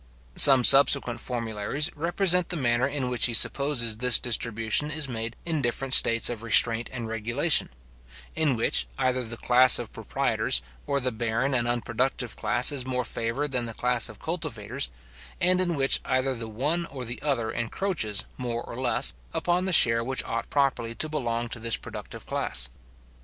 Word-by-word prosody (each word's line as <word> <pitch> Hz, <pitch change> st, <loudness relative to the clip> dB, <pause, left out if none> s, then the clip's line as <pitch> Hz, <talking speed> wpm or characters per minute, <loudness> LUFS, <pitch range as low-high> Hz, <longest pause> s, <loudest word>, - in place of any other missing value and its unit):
Some 135 Hz, -3 st, +7 dB
subsequent 135 Hz, -2 st, +7 dB
formularies 120 Hz, +5 st, -3 dB
represent 175 Hz, +3 st, 0 dB
the 180 Hz, -, -1 dB
manner 125 Hz, -3 st, 0 dB
in 140 Hz, -2 st, -4 dB
which 125 Hz, 0 st, 0 dB
he 120 Hz, -, -1 dB
supposes 120 Hz, -3 st, +1 dB
this 125 Hz, +1 st, +5 dB
distribution 115 Hz, +3 st, 0 dB
is 155 Hz, -1 st, -1 dB
made 115 Hz, -2 st, -6 dB
in 160 Hz, -3 st, -2 dB
different 130 Hz, +2 st, -2 dB
states 115 Hz, -3 st, +6 dB
of 120 Hz, -3 st, -4 dB
restraint 115 Hz, 0 st, +4 dB
and 120 Hz, -3 st, -6 dB
regulation; 115 Hz, +8 st, 0 dB, 0.7 s
in 155 Hz, -5 st, 0 dB
which, 115 Hz, -, 0 dB
either 130 Hz, -1 st, -1 dB
the 115 Hz, 0 st, -6 dB
class 125 Hz, +2 st, +5 dB
of -, -, -7 dB
proprietors, -, -, -1 dB, 0.2 s
or 140 Hz, 0 st, 0 dB
the 130 Hz, -1 st, -2 dB
barren 115 Hz, +4 st, -2 dB
and 120 Hz, -2 st, 0 dB
unproductive 120 Hz, +1 st, -3 dB
class, 120 Hz, +4 st, +2 dB
is 140 Hz, -3 st, -2 dB
more 125 Hz, -1 st, -4 dB
favoured 115 Hz, +7 st, -4 dB
than 125 Hz, -2 st, -2 dB
the 115 Hz, -, -8 dB
class 125 Hz, 0 st, 0 dB
of 110 Hz, -, -12 dB
cultivators; 140 Hz, -, -4 dB, 0.5 s
and 185 Hz, 0 st, +2 dB
in 175 Hz, -2 st, -1 dB
which 135 Hz, -1 st, +2 dB
either 130 Hz, +1 st, -1 dB
the 115 Hz, -2 st, -7 dB
one 150 Hz, +10 st, -2 dB
or 130 Hz, -2 st, -8 dB
the 120 Hz, +2 st, -6 dB
other 125 Hz, -7 st, -2 dB
encroaches, 115 Hz, -, -3 dB
more 120 Hz, -2 st, -5 dB
or 115 Hz, -, -10 dB
less, 125 Hz, -2 st, 0 dB, 0.2 s
upon 180 Hz, +1 st, -1 dB
the 190 Hz, -, -1 dB
share 115 Hz, -8 st, +4 dB
which 130 Hz, +2 st, -3 dB
ought 115 Hz, 0 st, -5 dB
properly 125 Hz, -5 st, -1 dB
to 155 Hz, -, -2 dB
belong 120 Hz, -6 st, -3 dB
to 115 Hz, -, -8 dB
this 115 Hz, 0 st, 0 dB
productive -, -, -10 dB
class. 65 Hz, -, -3 dB
125 Hz, 175 wpm, -25 LUFS, 115-140 Hz, 0.7 s, Some